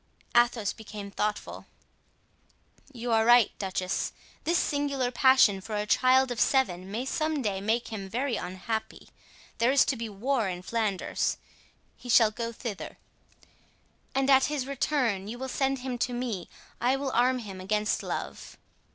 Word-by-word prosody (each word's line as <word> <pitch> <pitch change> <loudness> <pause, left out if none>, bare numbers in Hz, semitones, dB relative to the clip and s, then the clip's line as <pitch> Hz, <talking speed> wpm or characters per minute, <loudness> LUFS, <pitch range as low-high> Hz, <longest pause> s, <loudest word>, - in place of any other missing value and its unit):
Athos 240 -4 +3
became 210 -2 -9
thoughtful. 210 +1 -3 1.2
"You 240 -2 -4
are 225 -1 +4
right, 240 -1 +6
duchess. 185 -2 -2 0.3
This 340 +2 +2
singular 280 -5 0
passion 255 -6 +5
for 215 +2 -5
a 210 0 -1
child 255 +3 +4
of 230 -3 -2
seven 190 -9 +1
may 225 +6 -3
some 310 0 -1
day 195 -3 -1
make 225 +4 0
him 200 -4 -6
very 250 +3 -1
unhappy. 200 +4 -5 0.5
There 235 +2 +4
is 275 - +5
to 270 - 0
be 230 -2 -5
war 225 +2 0
in 180 0 -5
Flanders. 215 -2 -1 0.6
He 245 - -11
shall 225 -2 +6
go 230 +1 -4
thither." 225 -3 -6 1.2
"And 270 0 +2
at 265 0 +6
his 295 -3 -2
return 255 -7 0
you 230 +3 -6
will 265 +1 -5
send 270 +1 0
him 250 -2 -3
to 245 - -1
me. 235 -8 -3 0.3
I 250 +2 +3
will 270 -1 -2
arm 255 +2 +3
him 200 -6 -7
against 210 +3 0
love." - - -6
235 Hz, 155 wpm, -28 LUFS, 210-260 Hz, 1.2 s, right